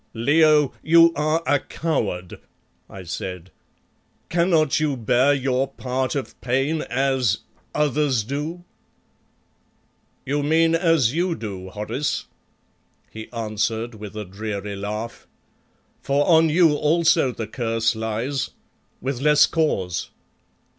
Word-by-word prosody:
"Leo, 150 +3 +4
you 165 +1 +6
are 155 +2 0
a 145 - +3
coward!" 110 - -3 0.5
I 95 - -9
said. 90 +1 -6 0.8
"Cannot 165 -4 +2
you 150 -3 0
bear 125 +4 +3
your 135 -1 +1
part 130 0 -3
of 140 - -5
pain 135 +5 0
as 130 -3 +1 0.3
others 145 -5 +1
do?" 150 +8 -4 1.6
"You 145 +2 0
mean 160 +3 +3
as 165 -8 +3
you 175 +1 0
do, 95 -6 -7
Horace," 105 +8 -3 0.9
he 110 0 -9
answered 115 +1 -2
with 105 -1 -9
a 105 -1 -5
dreary 100 +1 -5
laugh, 105 +3 -6 0.7
"for 140 +1 +1
on 165 -1 +5
you 165 0 +4
also 160 -2 +3
the 115 -2 -5
curse 115 0 -1
lies 110 +4 -2 0.5
with 130 0 -3
less 150 0 +6
cause. 95 - -1
135 Hz, 115 wpm, -22 LUFS, 110-155 Hz, 1.6 s, you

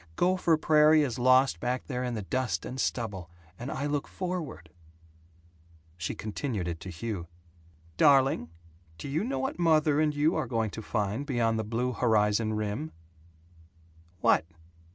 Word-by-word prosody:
Gopher 180 -2 +2
Prairie 155 0 +5
is 125 -3 -3
lost 130 +2 +4
back 125 +1 -2
there 125 -2 -3
in 125 -1 -2
the 105 - -4
dust 110 -5 -2
and 130 +1 -6
stubble, 100 -8 -3 0.3
and 125 - -5
I 140 - -3
look 145 -1 -1
forward 175 - -5 0.6
" 85 -1 -30
She 85 - -3
continued 105 - -3
it 85 -1 -4
to 95 - -8
Hugh: 90 0 -5 0.7
"Darling, 135 - +4 0.5
do - - -7
you 150 +7 -1
know 265 +5 -2
what 265 -8 -3
mother 155 -3 +3
and 155 -1 +2
you 150 +2 +2
are - - -1
going 115 -4 -1
to 110 - -6
find 105 +3 -2
beyond 120 -5 0
the - - -1
blue 115 +4 -1
horizon 110 -2 +2
rim?" 110 +9 -3 1.3
"What?" 80 - +4
120 Hz, 155 wpm, -29 LUFS, 105-145 Hz, 1.3 s, Prairie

